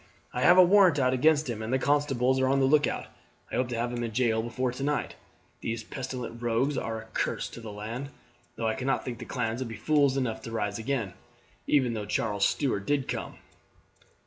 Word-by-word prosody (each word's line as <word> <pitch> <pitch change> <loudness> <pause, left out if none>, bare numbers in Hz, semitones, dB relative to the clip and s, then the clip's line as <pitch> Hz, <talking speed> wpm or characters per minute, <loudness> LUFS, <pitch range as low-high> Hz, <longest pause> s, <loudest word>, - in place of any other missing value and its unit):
I 125 - -2
have 175 +6 +6
a 185 - +10
warrant 185 -3 +5
out 130 -2 +2
against 150 +3 +3
him, 115 -3 -4
and 110 +2 -4
the 130 - +3
constables 130 -2 +2
are 130 - +2
on 135 +1 +3
the 135 - +4
lookout. 145 +2 +2 0.5
I - - -3
hope 125 - +1
to 120 -2 -3
have 120 +1 -1
him 120 0 -2
in 115 - -3
jail 110 -1 +1
before 120 +2 -2
tonight. 140 +4 -2 0.5
These 115 +1 -3
pestilent 125 -3 -6
rogues 120 +5 +1
are 115 -3 -3
a 110 - -10
curse - - -1
to - - -10
the 110 -2 -7
land, 115 +7 -5 0.5
though 115 - -3
I 110 - +1
cannot 135 +3 -1
think 120 -3 -5
the - - -7
clans 120 -1 -2
would 130 - -2
be 110 - -6
fools 145 -2 +2
enough 125 -5 -1
to 115 - -8
rise 105 -2 -2
again, 115 -5 -2 0.5
even 130 -5 +3
though 105 -2 -3
Charles 105 -2 +1
Stuart 100 -8 -1
did 145 -2 +1
come." - - -4
125 Hz, 215 wpm, -28 LUFS, 115-140 Hz, 0.5 s, a